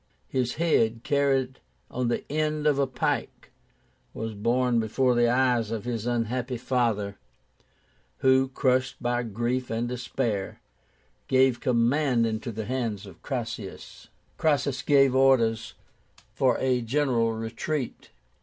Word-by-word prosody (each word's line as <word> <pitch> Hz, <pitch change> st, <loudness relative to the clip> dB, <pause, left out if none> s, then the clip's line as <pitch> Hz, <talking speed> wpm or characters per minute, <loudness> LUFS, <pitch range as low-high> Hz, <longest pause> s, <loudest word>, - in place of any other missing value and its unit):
His 125 Hz, -2 st, -1 dB
head, 115 Hz, -9 st, +1 dB
carried 135 Hz, -2 st, +1 dB, 0.3 s
on 125 Hz, 0 st, -1 dB
the 120 Hz, -, -1 dB
end 155 Hz, 0 st, -1 dB
of 145 Hz, -2 st, +3 dB
a 140 Hz, -, +2 dB
pike, 125 Hz, -1 st, -3 dB, 0.6 s
was 110 Hz, 0 st, -4 dB
borne 120 Hz, +3 st, +1 dB
before 125 Hz, +3 st, +1 dB
the 120 Hz, 0 st, +3 dB
eyes 125 Hz, -3 st, +2 dB
of 115 Hz, -1 st, -4 dB
his 120 Hz, -2 st, -3 dB
unhappy 120 Hz, +1 st, -1 dB
father, 115 Hz, -5 st, -1 dB, 1.1 s
who, 130 Hz, 0 st, +5 dB
crushed 130 Hz, -1 st, +1 dB
by 120 Hz, 0 st, 0 dB
grief 120 Hz, +3 st, -2 dB
and 115 Hz, +2 st, -1 dB
despair, 120 Hz, -4 st, -3 dB, 0.7 s
gave 130 Hz, -2 st, +3 dB
the -, -, -18 dB
command 125 Hz, 0 st, +2 dB
into 110 Hz, +1 st, -3 dB
the 110 Hz, 0 st, -5 dB
hands 115 Hz, -5 st, -3 dB
of 95 Hz, -4 st, -14 dB
Cassius. -, -, -6 dB, 0.3 s
Cassius 140 Hz, -4 st, +1 dB
gave 135 Hz, -3 st, +4 dB
orders 115 Hz, -4 st, +3 dB, 0.6 s
for 130 Hz, -3 st, +2 dB
a 130 Hz, -2 st, +1 dB
general 120 Hz, -2 st, +1 dB
retreat. 115 Hz, +5 st, -4 dB
125 Hz, 125 wpm, -26 LUFS, 115-130 Hz, 1.1 s, who